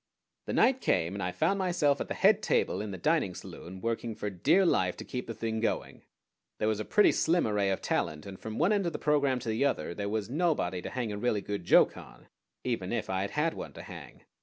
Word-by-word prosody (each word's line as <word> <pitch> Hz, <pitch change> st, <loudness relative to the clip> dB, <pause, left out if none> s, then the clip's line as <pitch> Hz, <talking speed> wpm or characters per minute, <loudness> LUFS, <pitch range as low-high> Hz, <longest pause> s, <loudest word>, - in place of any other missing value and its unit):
The -, -, -2 dB
night 265 Hz, 0 st, +3 dB
came, 85 Hz, +3 st, +1 dB
and 100 Hz, -, -4 dB
I 90 Hz, -, -1 dB
found 170 Hz, -, +1 dB
myself 170 Hz, -6 st, +2 dB
at -, -, -3 dB
the -, -, -4 dB
head 205 Hz, +2 st, +4 dB
table 215 Hz, -, +1 dB
in 105 Hz, -, -4 dB
the 95 Hz, -, -5 dB
dining 150 Hz, -, +1 dB
saloon 95 Hz, +2 st, -9 dB
working 115 Hz, -1 st, -2 dB
for 105 Hz, -, -4 dB
dear 155 Hz, -, +3 dB
life 90 Hz, -, +2 dB
to -, -, -7 dB
keep 125 Hz, -, -5 dB
the 115 Hz, -, -5 dB
thing 110 Hz, 0 st, -2 dB
going. 115 Hz, -, -2 dB, 0.6 s
There 105 Hz, -, 0 dB
was 110 Hz, -1 st, 0 dB
a 110 Hz, -, -3 dB
pretty 210 Hz, -, +5 dB
slim 170 Hz, +2 st, +2 dB
array 105 Hz, -2 st, +1 dB
of 95 Hz, -, -2 dB
talent, 75 Hz, 0 st, -1 dB
and 95 Hz, -1 st, -9 dB
from 110 Hz, 0 st, -6 dB
one 175 Hz, +7 st, +3 dB
end 200 Hz, -4 st, +1 dB
of 170 Hz, -, -2 dB
the -, -, -2 dB
program 140 Hz, -3 st, +2 dB
to 115 Hz, -, -4 dB
the 110 Hz, +5 st, +1 dB
other 140 Hz, -10 st, 0 dB
there 100 Hz, +2 st, -3 dB
was 105 Hz, -1 st, -2 dB
nobody 135 Hz, -, 0 dB
to -, -, -5 dB
hang 120 Hz, -4 st, -3 dB
a 105 Hz, -, -4 dB
really 110 Hz, -3 st, 0 dB
good 100 Hz, -4 st, -5 dB
joke -, -, +5 dB
on, -, -, -13 dB, 0.3 s
even 115 Hz, -7 st, -2 dB
if 115 Hz, -4 st, -2 dB
I 95 Hz, 0 st, 0 dB
had 100 Hz, -, -2 dB
had 160 Hz, +2 st, 0 dB
one -, -, -7 dB
to -, -, -9 dB
hang. -, -, -11 dB
115 Hz, 250 wpm, -30 LUFS, 100-155 Hz, 0.6 s, pretty